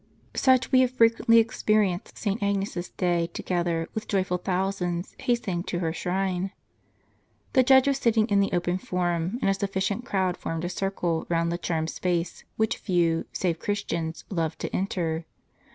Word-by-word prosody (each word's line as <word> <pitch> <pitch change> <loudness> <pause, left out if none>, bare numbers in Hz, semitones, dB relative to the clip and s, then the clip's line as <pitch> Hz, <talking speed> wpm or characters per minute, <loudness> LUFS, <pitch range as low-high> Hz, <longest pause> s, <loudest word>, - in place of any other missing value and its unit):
Such 260 -1 +3
we 255 - +6
have 255 -1 +4
frequently 230 -2 +4
experienced 215 -4 +1
St. 205 0 -2
Agnes's 195 -3 -1
day, 175 -2 0
together 170 -2 -1
with 220 -1 -4
joyful 185 -2 0
thousands, 180 -1 -2
hastening 210 -8 0
to 175 - -2
her 165 -2 -1
shrine. 185 +2 -1 1.0
The 260 - +6
judge 265 +1 +6
was 275 -1 +2
sitting 225 -4 +3
in 200 -3 +3
the 200 - +2
open 175 +1 0
Forum, 175 +2 -1
and - - +3
a - - +3
sufficient 195 +3 -1
crowd 190 -6 0
formed 165 +1 -3
a - - -2
circle 180 -3 -2
round 170 0 +1
the 170 - -2
charmed 160 -2 -1
space, 175 -1 -2
which 220 0 +1
few, 170 -4 +1
save 170 -3 -1
Christians, 170 -5 -3
loved 165 -4 -1
to - - -3
enter. 170 -4 -1
185 Hz, 160 wpm, -26 LUFS, 175-205 Hz, 1.0 s, we